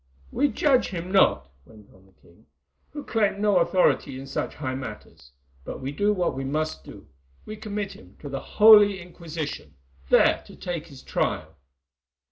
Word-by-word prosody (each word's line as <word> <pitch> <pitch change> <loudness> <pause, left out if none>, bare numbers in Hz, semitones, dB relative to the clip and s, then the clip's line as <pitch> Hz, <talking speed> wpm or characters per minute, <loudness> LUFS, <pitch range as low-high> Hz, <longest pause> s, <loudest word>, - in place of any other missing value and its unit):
"We 285 +3 +2
judge 275 -3 +2
him 180 -1 -6
not," 70 - +3
went 105 +5 -18
on 95 +1 -22
the - - -25
king, 85 -1 -24 0.4
"who 295 0 -8
claim 205 -3 0
no 205 -2 +3
authority 170 -6 +1
in 135 - -8
such 135 - -4
high 130 -3 -4
matters, 105 - -9 0.3
but - - -7
we 135 +1 -4
do 205 +8 +1
what 180 -4 0
we 135 - -5
must 155 +3 -3
do—we 65 - -13
commit 205 -2 -5
him 90 +1 -17
to 145 - -7
the 135 -1 -4
Holy 210 0 +6
Inquisition, 170 -3 -7 0.3
there - - +4
to - - -13
take 170 -2 -5
his 140 -4 -14
trial!" - - -2
165 Hz, 165 wpm, -25 LUFS, 130-205 Hz, 0.4 s, Holy